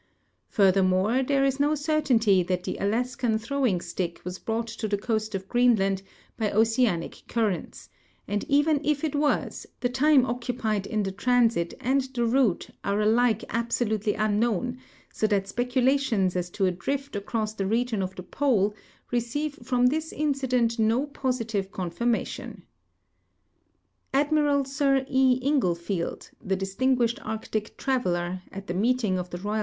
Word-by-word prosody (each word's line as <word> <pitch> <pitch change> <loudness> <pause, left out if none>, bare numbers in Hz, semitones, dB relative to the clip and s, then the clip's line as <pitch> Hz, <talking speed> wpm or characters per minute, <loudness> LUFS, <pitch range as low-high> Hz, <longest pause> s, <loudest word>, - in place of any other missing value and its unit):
Furthermore, 195 +4 +3
there 275 +1 +1
is 270 0 0
no 295 +2 +3
certainty 270 - +2
that 180 0 -2
tlie - - -4
,\laskan 235 +2 0
throwing 235 -5 0
stick 170 -1 -4
was 180 +1 -6
l»rought 225 +1 0
to 230 -1 -5
the 205 -1 0
coast 215 0 -2
of 190 0 -5
Greenland 215 -6 +3 0.4
Ijy 215 -2 0
oceanic 225 -5 +1
currents, 215 -6 -2 0.4
and 205 0 -1
even 290 +1 +3
if 300 -1 0
it 310 - -1
was, 290 0 0
the 245 - 0
time 265 +1 +4
occupied 235 -4 -2
in 215 -1 -1
the 195 - -2
transit 230 -4 +1
and 270 +3 +2
the 240 -1 +1
route 235 -6 +1
are 200 +1 0
alike 225 +1 +3
abso 235 0 -1
lutely 215 -1 0
unknown, 215 +3 0 0.3
so 215 - +1
that 200 -2 0
speculations 245 -5 +1
as 180 -1 -2
to 195 +2 -1
a 185 - +2
drift 275 +10 -4
across 215 +1 -2
the 195 -3 -2
region 230 0 0
of 190 0 -4
the 185 - -7 0.2
I'ole 215 -8 +3 0.4
receive 250 +5 -2
from 245 0 +1
this 315 +5 +1
incident 255 -6 0
no 225 +5 +2
))ositive 230 -8 -2
con 185 -3 -4
tirmation. 235 +5 -2 1.5
Ailmiral 290 -1 +2
Sir 275 -1 +1
E. 260 -1 +3
Inglefield, 180 - -1
the 190 - 0
distinguished 235 +5 0
Arctic 215 0 -4
traveler, 180 -9 -1
at 195 0 -8
the 175 - -4
meeting 215 -1 +1
of 180 0 -5
the 175 - -5
Koval 210 +4 -2
230 Hz, 150 wpm, -26 LUFS, 195-260 Hz, 1.5 s, time